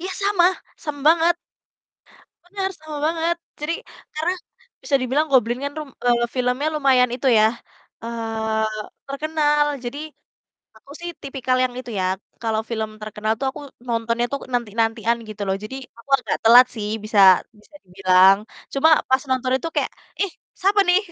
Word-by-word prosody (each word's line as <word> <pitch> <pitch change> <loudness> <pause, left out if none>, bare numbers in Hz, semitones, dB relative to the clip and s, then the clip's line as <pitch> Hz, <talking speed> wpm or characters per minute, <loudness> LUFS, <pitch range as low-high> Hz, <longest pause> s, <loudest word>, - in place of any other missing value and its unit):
ya, 375 +2 -4
sama 395 -3 +3 0.3
sama 290 -2 -6
banget. 335 +1 +4 1.1
Bener, 385 +1 -3
sama 310 -1 -7
banget 330 +1 0 0.2
jadi 300 +3 -2 0.4
karena 325 +4 0 0.5
bisa 285 - +1
dibilang 275 +5 +1
Goblin 245 -2 +3
kan 285 - -2
rum 305 -3 -6 0.2
eee, 240 -1 +3
filmnya 250 +4 0
lumayan 265 -4 +4
itu 260 +2 -2
ya, 215 - +6 0.6
eee, 225 -1 -2 0.4
terkenal, 295 +1 +1 0.2
jadi 245 +4 -5 0.8
aku - - -19
sih 345 0 -5
tipikal 260 -2 -1
yang 255 - -2
itu 250 - -10
ya, - - 0 0.4
kalau 220 -1 0
film 220 -2 -2
terkenal 215 0 -2
tuh 270 - -1
aku 265 - -10 0.3
nontonnya 230 0 0
tuh 280 - -1 0.2
nanti-nantian, 230 0 0
gitu 210 -1 -7
loh, 190 0 0
jadi 260 +5 -6 0.2
aku 235 - -17
agak 225 -5 -2
telat 240 +3 +9
sih 210 -1 -3 0.2
bisa 215 -1 -1 0.4
bisa 255 - -25
dibilang. 185 +1 +5 0.4
Cuma 275 +3 +4 0.2
pas 260 0 +3
nonton 255 0 0
itu 265 - -4
kayak, - - +1 0.3
"Ih, 395 - -1 0.3
siapa 400 +2 +3
nih?" 360 +1 +6
255 Hz, 155 wpm, -22 LUFS, 225-305 Hz, 1.1 s, telat